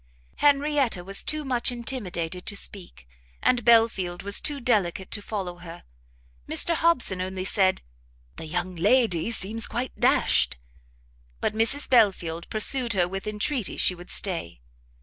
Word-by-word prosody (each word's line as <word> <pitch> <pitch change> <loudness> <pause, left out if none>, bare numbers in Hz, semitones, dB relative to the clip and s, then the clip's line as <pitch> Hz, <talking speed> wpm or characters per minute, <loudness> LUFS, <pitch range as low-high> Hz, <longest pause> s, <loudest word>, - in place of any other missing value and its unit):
Henrietta 280 -8 +2
was 195 +2 0
too 305 -1 -3
much 250 -1 0
intimidated 185 -8 -5
to 205 - -2
speak, 175 - -7 0.3
and 245 -2 +1
Belfield 220 -6 +3
was 200 +1 0
too 290 -2 -3
delicate 200 -7 -1
to 205 - -2
follow 190 -4 -5
her; 175 -1 -11 0.7
Mr 340 - +2
Hobson 305 - +2
only 185 0 -4
said 190 -1 +2 0.5
"The 160 - -7
young 180 +3 -3
lady 210 0 +2
seems 225 0 0
quite 240 +3 -4
dashed;" 70 - +2 0.8
but - - -1
Mrs 230 +6 +1
Belfield 185 -9 +2
pursued 235 +2 +3
her 180 -3 +2
with 195 +3 -6
entreaties 215 - -1
she - - +4
would 175 0 -13
stay. 165 - -2
205 Hz, 140 wpm, -25 LUFS, 180-245 Hz, 0.8 s, she